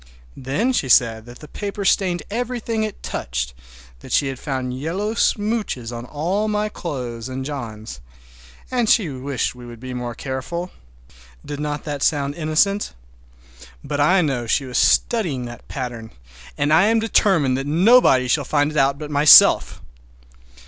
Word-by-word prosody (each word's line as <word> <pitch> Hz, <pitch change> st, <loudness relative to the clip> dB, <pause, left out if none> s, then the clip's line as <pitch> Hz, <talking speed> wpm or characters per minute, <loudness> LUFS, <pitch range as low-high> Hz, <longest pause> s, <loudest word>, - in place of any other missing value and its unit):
Then 185 Hz, -, -1 dB
she 135 Hz, -, -1 dB
said 115 Hz, -2 st, +3 dB
that 120 Hz, 0 st, -13 dB
the 150 Hz, -, -10 dB
paper 200 Hz, +2 st, -5 dB
stained 185 Hz, -2 st, +1 dB
everything 235 Hz, -1 st, -2 dB
it 215 Hz, -1 st, -5 dB
touched, 60 Hz, 0 st, -4 dB, 0.5 s
that -, -, -12 dB
she 140 Hz, -, +2 dB
had 135 Hz, -2 st, -6 dB
found 130 Hz, -3 st, -4 dB
yellow 190 Hz, +9 st, -2 dB
smooches 210 Hz, -, -1 dB
on 120 Hz, +1 st, -7 dB
all 175 Hz, +10 st, -2 dB
my 210 Hz, 0 st, -1 dB
clothes 125 Hz, -, -6 dB
and 130 Hz, +1 st, -5 dB
John's, 115 Hz, -, -7 dB, 0.7 s
and 240 Hz, -4 st, +1 dB
she 200 Hz, -8 st, +3 dB
wished 135 Hz, 0 st, -3 dB
we 125 Hz, 0 st, -13 dB
would 120 Hz, -1 st, -11 dB
be 130 Hz, +1 st, -7 dB
more 120 Hz, -1 st, -5 dB
careful! 140 Hz, +9 st, -5 dB, 0.7 s
Did 145 Hz, -1 st, -6 dB
not 150 Hz, -1 st, -3 dB
that 145 Hz, -2 st, -5 dB
sound 145 Hz, -2 st, +1 dB
innocent? 170 Hz, +6 st, 0 dB, 0.9 s
But 145 Hz, 0 st, -4 dB
I 180 Hz, +6 st, +4 dB
know 130 Hz, -6 st, -2 dB
she 135 Hz, +4 st, +1 dB
was 125 Hz, -2 st, -1 dB
studying 165 Hz, -, +1 dB
that 120 Hz, 0 st, -10 dB
pattern, 120 Hz, -4 st, -6 dB, 0.5 s
and 145 Hz, +2 st, +1 dB
I 165 Hz, +5 st, +5 dB
am 225 Hz, +2 st, +3 dB
determined 190 Hz, -, +2 dB
that 135 Hz, -, -5 dB
nobody 165 Hz, -, +4 dB
shall 145 Hz, +4 st, +1 dB
find 145 Hz, +2 st, 0 dB
it 155 Hz, -, -5 dB
out 140 Hz, 0 st, +2 dB
but 150 Hz, 0 st, -7 dB
myself! 145 Hz, +1 st, +6 dB
145 Hz, 160 wpm, -21 LUFS, 125-190 Hz, 0.9 s, myself